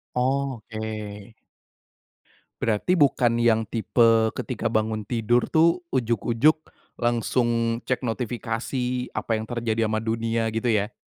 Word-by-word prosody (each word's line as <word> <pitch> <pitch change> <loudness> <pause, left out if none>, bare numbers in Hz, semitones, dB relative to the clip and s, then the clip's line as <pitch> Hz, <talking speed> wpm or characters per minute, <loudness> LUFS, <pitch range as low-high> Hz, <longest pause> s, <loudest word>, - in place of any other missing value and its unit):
Oh, 130 -1 0
oke. 110 -1 -6 1.3
Berarti 115 - +1
bukan 125 -7 +3
yang 115 -1 +3
tipe 115 0 +3
ketika 115 -3 -2
bangun 110 -1 0
tidur 120 +3 0
tuh 170 +2 +3
ujug-ujug 120 +5 +2 0.4
langsung 120 0 +1
cek 130 +1 -2
notifikasi? 125 +2 -3
Apa 115 - -1
yang 110 - -8
terjadi 115 -2 -1
ama 110 - 0
dunia, 115 +1 -1
gitu 115 +2 0
ya? 105 -1 +1
115 Hz, 115 wpm, -25 LUFS, 110-125 Hz, 1.3 s, bukan